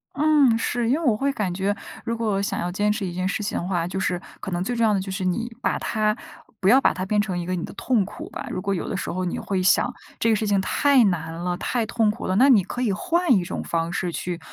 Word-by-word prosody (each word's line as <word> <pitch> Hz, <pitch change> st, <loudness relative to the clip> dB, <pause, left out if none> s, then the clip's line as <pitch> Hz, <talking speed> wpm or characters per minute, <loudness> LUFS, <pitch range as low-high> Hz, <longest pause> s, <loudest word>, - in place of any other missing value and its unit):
嗯， 290 Hz, -5 st, +4 dB
是。 235 Hz, 0 st, -1 dB
因 260 Hz, -, +4 dB
为 -, -, -2 dB
我 235 Hz, -5 st, +4 dB
会 275 Hz, +6 st, 0 dB
感 210 Hz, -9 st, -2 dB
觉 195 Hz, +2 st, 0 dB, 0.3 s
如 230 Hz, -1 st, -2 dB
果 215 Hz, -4 st, 0 dB
想 200 Hz, -, -2 dB
要 175 Hz, -, -2 dB
坚 205 Hz, +3 st, +1 dB
持 210 Hz, -1 st, -2 dB
一 175 Hz, -, -4 dB
件 185 Hz, +1 st, -1 dB
事 205 Hz, +2 st, -2 dB
情 205 Hz, -, -2 dB
的 -, -, -2 dB
话， 175 Hz, -3 st, 0 dB
就 190 Hz, +2 st, -3 dB
是 180 Hz, -2 st, -1 dB, 0.2 s
可 195 Hz, -, -6 dB
能 175 Hz, 0 st, -1 dB
最 245 Hz, +6 st, -2 dB
重 230 Hz, -, +1 dB
要 215 Hz, -, +3 dB
的 200 Hz, -, +1 dB
就 190 Hz, 0 st, -5 dB
是 190 Hz, 0 st, -3 dB
你 230 Hz, +7 st, -1 dB
把 -, -, 0 dB
它 215 Hz, -1 st, 0 dB, 0.5 s
不 190 Hz, -, +1 dB
要 255 Hz, +7 st, +7 dB
把 -, -, +3 dB
它 185 Hz, -, -4 dB
变 210 Hz, +2 st, +2 dB
成 190 Hz, -4 st, -3 dB
一 175 Hz, -, -4 dB
个 185 Hz, +1 st, -1 dB
你 175 Hz, -, -3 dB
的 -, -, -7 dB
痛 230 Hz, 0 st, +1 dB
苦 205 Hz, -, -9 dB
吧。 -, -, -6 dB
如 185 Hz, -, -3 dB
果 200 Hz, +1 st, -1 dB
有 175 Hz, -, -4 dB
的 195 Hz, -, -2 dB
时 -, -, -4 dB
候 185 Hz, +1 st, -2 dB
你 175 Hz, -, -2 dB
会 190 Hz, -2 st, -1 dB
想 245 Hz, +6 st, +3 dB, 0.3 s
这 230 Hz, -, +2 dB
个 220 Hz, -, +4 dB
事 215 Hz, -, -1 dB
情 200 Hz, -1 st, +3 dB
太 275 Hz, +5 st, +4 dB
难 165 Hz, -4 st, -1 dB
了、 175 Hz, +2 st, -2 dB
太 235 Hz, +4 st, -1 dB
痛 225 Hz, -1 st, +1 dB
苦 215 Hz, -, -7 dB
了， 185 Hz, -, 0 dB
那 260 Hz, +7 st, +6 dB
你 220 Hz, -8 st, +6 dB
可 245 Hz, +5 st, -5 dB
以 235 Hz, -5 st, +1 dB
换 345 Hz, -, +1 dB
一 190 Hz, -5 st, +3 dB
种 -, -, -4 dB
方 165 Hz, 0 st, -2 dB
式 180 Hz, -2 st, -1 dB
去 175 Hz, +1 st, -4 dB
200 Hz, 315 characters per minute, -24 LUFS, 185-230 Hz, 0.5 s, 要